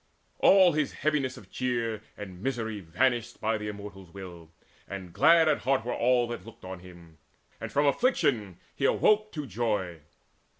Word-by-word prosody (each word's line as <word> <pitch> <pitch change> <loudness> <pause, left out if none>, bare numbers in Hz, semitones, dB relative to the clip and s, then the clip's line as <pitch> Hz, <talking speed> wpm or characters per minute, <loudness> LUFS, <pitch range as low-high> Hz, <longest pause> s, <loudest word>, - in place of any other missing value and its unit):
All 190 -2 +6
his 155 -2 -1
heaviness 145 -4 -1
of - - -14
cheer 115 -4 -2 0.2
And 95 -3 -9
misery 110 -4 -2
vanished 115 +7 0
by 110 0 0
the 105 - -5
Immortals' 100 -3 -8
will; 85 -4 -10 0.4
And 95 -3 -7
glad 165 +3 +5
at 150 - +2
heart 130 -2 0
were 120 - -2
all 120 0 +2
that 120 -6 -5
looked 115 -3 -13
on 95 0 -7
him; 85 -3 -15 0.4
And - - -6
from 145 +1 +2
affliction 140 - +1 0.2
he - - -1
awoke 215 0 +3
to 150 -2 -4
joy. 105 -7 -2
115 Hz, 165 wpm, -28 LUFS, 95-135 Hz, 0.4 s, All